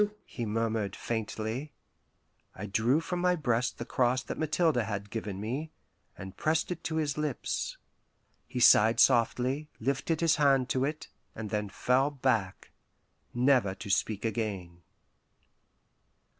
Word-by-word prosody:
"Jesu 210 0 +1
" - - -40
he 120 - -5
murmured 110 -2 -1
faintly. 115 +4 -4 0.8
I 95 - -6
drew 115 +9 +2
from 175 +2 -3
my 180 0 +3
breast 125 -6 0
the 120 - -5
cross 125 +1 +1
that - - -6
Mathilde 155 -1 +2
had 105 -3 -2
given 105 -4 -4
me, 130 +9 -3 0.5
and 95 0 -9
pressed 160 +2 0
it 175 -1 -5
to 160 - -2
his 150 -2 -1
lips. 150 -4 -2 0.7
He 125 - -4
sighed 115 -1 +6
softly, 130 +5 +3
lifted 140 +6 -1
his 165 -2 +3
hand 135 -4 +3
to 130 0 +1
it, 150 +2 -5 0.3
and 110 -2 -6
then 105 -1 -1
fell 125 +7 +2
back, 120 -9 -1 0.6
never 120 -6 +2
to 100 0 -6
speak 105 +2 0
again. 100 -6 -3
120 Hz, 145 wpm, -30 LUFS, 110-145 Hz, 0.8 s, sighed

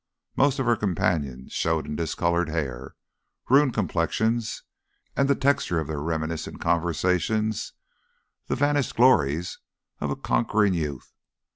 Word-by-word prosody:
Most 140 0 +3
of 135 - -1
her 120 0 +4
companions 80 - -1
showed 80 -1 0
in 75 - -5
discoloured 85 +2 0
hair, 65 -5 -4 0.6
ruined 135 -1 +5
complexions, 110 +5 0 0.5
and 140 0 +2
the 140 - +4
texture 135 -12 +1
of 80 - -2
their 75 -2 -3
reminiscent 80 0 -3
conversations, 90 +6 0 0.7
the - - 0
vanished 145 -1 +1
glories 90 - +3 0.4
of 75 - -2
a 70 - -1
conquering 100 - +1
youth. 75 -6 -4
85 Hz, 125 wpm, -25 LUFS, 80-115 Hz, 0.7 s, ruined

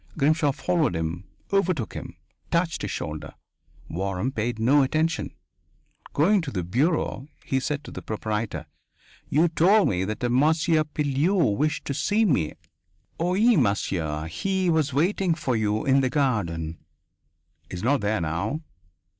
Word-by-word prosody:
Grimshaw 150 0 +3
followed 155 - 0
him, 80 +3 -3 0.3
overtook 180 - +1
him, - - -7 0.3
touched 170 0 0
his - - -3
shoulder. 75 -1 -5 0.5
Waram 95 +7 -2
paid 115 -1 -2
no 130 +6 +4
attention. 155 +5 0 0.8
Going 190 +7 +3
to 160 - -5
the 95 -9 -3
bureau 135 - 0 0.2
he 135 - 0
said 145 +2 -3
to - - -10
the - - -7
proprietor: 105 -6 -3 0.6
"You 160 +5 +4
told 190 +6 +4
me 90 -1 0
that 105 +3 -4
a 120 - +1
Monsieur 155 +4 +3
Pilleux 150 - +1
wished 150 +5 -1
to 140 - -2
see 215 +9 +2
me." 130 - +1 0.7
"Oui, 200 +7 +3
monsieur. 85 - 0
He 185 - 0
was 155 -3 +1
waiting 175 +4 +1
for 150 -6 -1
you 110 -1 0
in 135 0 +4
the 130 - +1
garden." 85 - -1 0.9
"He - - -6
is 90 - -6
not 140 +4 +2
there 105 -2 0
now." 85 - -2
135 Hz, 145 wpm, -25 LUFS, 105-160 Hz, 0.9 s, no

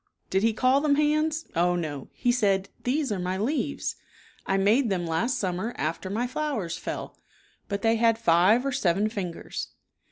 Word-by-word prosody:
Did 190 - +2
he 225 +2 +3
call 255 +5 +3
them 290 -1 +3
hands? 305 +1 +1
Oh, 175 +1 +3
no! 150 -6 -4
He 245 - +1
said, 200 -5 +1
" - - -33
These 275 +1 0
are 200 - -1
my 180 +1 -2
leaves. 280 +6 -2 0.5
I 195 - +2
made 220 +6 +3
them 180 -3 -1
last 195 +11 0
summer 190 +5 -2
after 165 +4 -2
my 225 +5 -1
flowers 250 - -2
fell." - - -6 0.5
But 200 0 -3
they 225 0 +3
had 230 0 +3
five 210 +4 +4
or 275 - 0
seven 205 -4 +1
fingers. 185 -6 -5
215 Hz, 180 wpm, -26 LUFS, 185-255 Hz, 0.5 s, five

